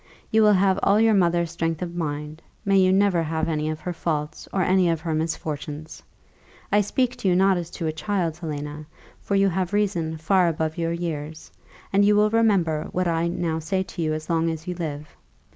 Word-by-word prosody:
You 220 - +4
will 210 -1 +6
have 190 0 +3
all 200 +2 +4
your 225 0 +4
mother's 170 -3 +2
strength 165 0 -2
of 175 -1 -5
mind; 150 -1 -4 0.2
may 195 -1 +4
you 185 0 +4
never 190 -3 +3
have 160 0 -1
any 155 -1 -1
of 155 0 -4
her 180 - -4
faults, 155 -2 -3
or 190 - +1
any 185 -1 +3
of 165 -2 0
her 165 -1 -2
misfortunes! 155 -1 -4 0.7
I 205 - +5
speak 250 +5 0
to - - -2
you 180 - +4
not 190 +1 +4
as 175 -2 -4
to 170 - -5
a 155 - 0
child, 170 -1 -2
Helena, 150 -2 -6 0.3
for 200 - -1
you 195 0 +4
have 185 +1 -2
reason 175 -6 0
far 180 +3 +3
above 160 -1 -1
your 165 -1 -1
years; 160 -2 -5 0.4
and 200 +1 +5
you 205 +1 +4
will 210 +1 +3
remember 195 -9 +2
what 185 0 0
I 165 0 +1
now 170 -2 -2
say 185 +4 -1
to 180 - -7
you 155 -1 0
as 155 0 -6
long 165 0 +1
as 160 0 -5
you 180 - -2
live. 150 -4 -6
170 Hz, 210 wpm, -24 LUFS, 160-190 Hz, 0.7 s, will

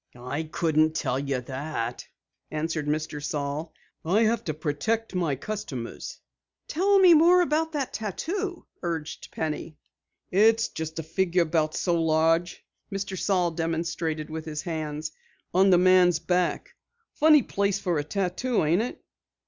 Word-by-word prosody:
"I 125 +5 -4
couldn't 155 0 +1
tell 130 -4 0
you 140 -2 -2
that," 130 -2 -4 0.4
answered 155 -1 -2
Mr. 150 -1 -2
Saal. 150 +2 -3 0.3
"I 195 +8 +3
have 230 +1 +1
to 155 - -1
protect 165 +10 -2
my 170 -6 0
customers." 140 - -6 0.5
"Tell 395 +5 +3
me 370 -3 +8
more 345 +3 +6
about 320 0 0
the 285 -4 -1
tattoo," 350 - -3 0.2
urged 165 -3 -4
Penny. 155 0 -4 0.5
"It's 225 +4 +4
just 160 0 -6
a 165 - -3
figure 175 +2 +1
about 155 -1 0
so 170 -2 +1
large 165 +2 +1
" - - -49
Mr. 195 -1 -3
Saal 180 -2 +1
demonstrated 165 -1 -2
with 160 0 -5
his 155 -1 -5
hands, 155 -2 -4 0.4
"on 190 +2 +5
the 180 - +6
man's 180 -2 +5
back. 180 +1 -1 0.4
Funny 305 -3 +5
place 200 -1 0
for 180 -6 -1
a - - -1
tattoo, 195 - -1
ain't 170 +6 +3
it?" 245 - -5
165 Hz, 145 wpm, -26 LUFS, 155-200 Hz, 0.5 s, me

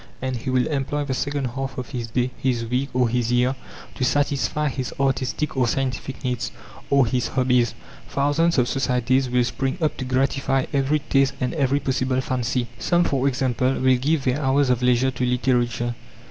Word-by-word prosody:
And 130 0 -2
he 125 +3 -5
will 130 -1 +2
employ 145 0 -1
the 135 - -2
second 145 +1 -2
half 135 +1 -4
of 125 -1 -5
his 120 -4 -4
day, 125 +2 -1
his 120 -3 -1
week, 125 +4 -1
or 125 -1 +2
his 120 0 0
year, 125 +2 +2 0.4
to 130 - -3
satisfy 145 +2 +1
his 130 -2 -3
artistic 135 +2 0
or 130 -2 +2
scientific 130 +1 -2
needs, 125 -1 -2 0.4
or 140 -2 +4
his 120 +1 0
hobbies. 125 -2 +1 0.3
Thousands 145 +4 +1
of 125 -1 +3
societies 130 0 +1
will 125 0 +2
spring 135 +4 -2
up 155 -3 0
to 130 - -4
gratify 135 +1 +1
every 140 +2 +2
taste 135 -2 +1
and 125 -3 -1
every 140 -3 +1
possible 130 -1 0
fancy. 125 -1 -1
Some, 175 0 +2
for 135 -4 +1
example, 130 -1 +1
will 130 -1 +3
give 145 +3 0
their 130 +3 0
hours 135 -1 +2
of 125 -1 +1
leisure 125 +1 +3
to 125 0 -4
literature. 120 -1 +1
130 Hz, 185 wpm, -23 LUFS, 125-135 Hz, 0.4 s, or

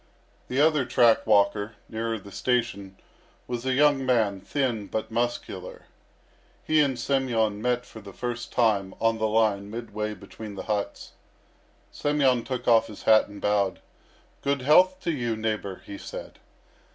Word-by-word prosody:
The 130 - -1
other 150 -2 +4
track 120 -2 +3
walker, 100 +1 +2
nearer 115 0 -3
the 100 -1 -12
station, 100 -5 -1 0.5
was 120 +1 -4
a 130 - +2
young 145 -1 +4
man, 110 -7 +1
thin, 120 -7 -2
but 110 - -4
muscular. 120 +1 -3 0.8
He 155 0 +2
and 135 -4 +1
Semyon 120 -5 0
met 125 +1 0
for 110 -2 -12
the 100 -1 -11
first 120 +3 -5
time 105 -5 +1
on 115 0 +1
the 110 - +1
line 105 -2 +1
midway 110 -1 -4
between 105 +2 -10
the - - -6
huts. 105 -2 -3 0.8
Semyon 135 -5 +1
took 125 -1 -5
off 115 -2 +5
his 105 - -11
hat 110 -1 +5
and 100 0 -11
bowed. 105 -1 +1 0.6
"Good 140 -2 -1
health 185 +6 +5
to 170 - -1
you, 120 -6 -1
neighbour," 110 -3 -3
he 100 - -8
said. - - -9
115 Hz, 150 wpm, -26 LUFS, 105-130 Hz, 0.8 s, off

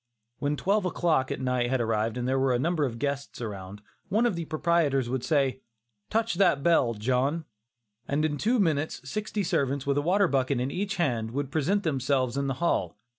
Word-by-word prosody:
When 145 +1 -1
twelve 205 +6 +1
o'clock 165 -7 +1
at - - -3
night 125 -2 0
had 130 0 +1
arrived 115 0 0
and 125 0 -2
there 135 +1 +1
were 130 -1 +2
a - - +2
number 160 +3 +1
of 120 -3 -4
guests 140 +2 -3
around, 100 -3 -7 0.3
one 220 +5 +2
of 235 -6 +1
the 170 -1 -4
proprietors 155 -6 +1
would 130 -1 -2
say, 135 -4 +1 0.5
"Touch 225 +1 +1
that 175 -6 +3
bell, 145 -9 +3
John"; 130 +8 0 0.6
and 150 +2 +1
in 145 -2 -2
two 240 +4 +2
minutes 155 -7 0
sixty 210 +5 -2
servants 140 -4 0
with 140 0 +1
a - - 0
water 190 +5 +3
bucket 135 -3 +1
in 130 +2 -1
each 195 +4 -2
hand, 120 -11 0
would 140 +3 -3
present 190 +7 +1
themselves 130 -4 0
in 140 0 -1
the 135 - -1
hall. 130 - 0
140 Hz, 200 wpm, -27 LUFS, 125-170 Hz, 0.6 s, that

